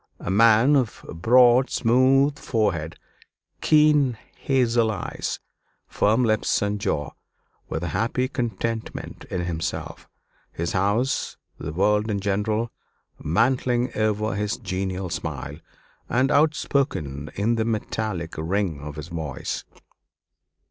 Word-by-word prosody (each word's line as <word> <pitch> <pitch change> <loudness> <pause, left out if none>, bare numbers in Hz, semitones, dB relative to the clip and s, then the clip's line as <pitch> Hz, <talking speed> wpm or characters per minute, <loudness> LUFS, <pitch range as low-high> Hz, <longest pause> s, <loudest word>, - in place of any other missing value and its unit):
A 90 - -3
man 115 +6 +5
of 125 -5 -1
broad 125 - +5
smooth 135 +4 +3
forehead, 85 -9 -1 0.7
keen 150 -5 +4 0.2
hazel 120 -4 +2
eyes, 105 -4 -4 0.5
firm 110 +5 +2
lips 110 -1 +1
and 105 0 -2
jaw; 75 -7 -1 0.6
with 80 - -3
a 90 - -2
happy 125 +3 0
contentment 115 -3 -4
in 90 - -2
himself, 85 -2 -4 0.4
his 85 +1 -3
house, 105 +8 0 0.2
the - - -5
world 105 +6 +2
in 100 -2 0
general, 105 +3 -1 0.5
mantling 120 - +1
over 110 0 0
his 105 +2 -2
genial 95 -3 -3
smile, 75 -3 -5 0.5
and 130 +4 +2
outspoken 135 - +1
in 105 +4 +1
the 115 -1 +1
metallic 110 -6 -3
ring 85 -1 -1
of 75 +1 -7
his 75 +2 -7
voice. 80 -5 -4
110 Hz, 115 wpm, -24 LUFS, 90-125 Hz, 0.7 s, man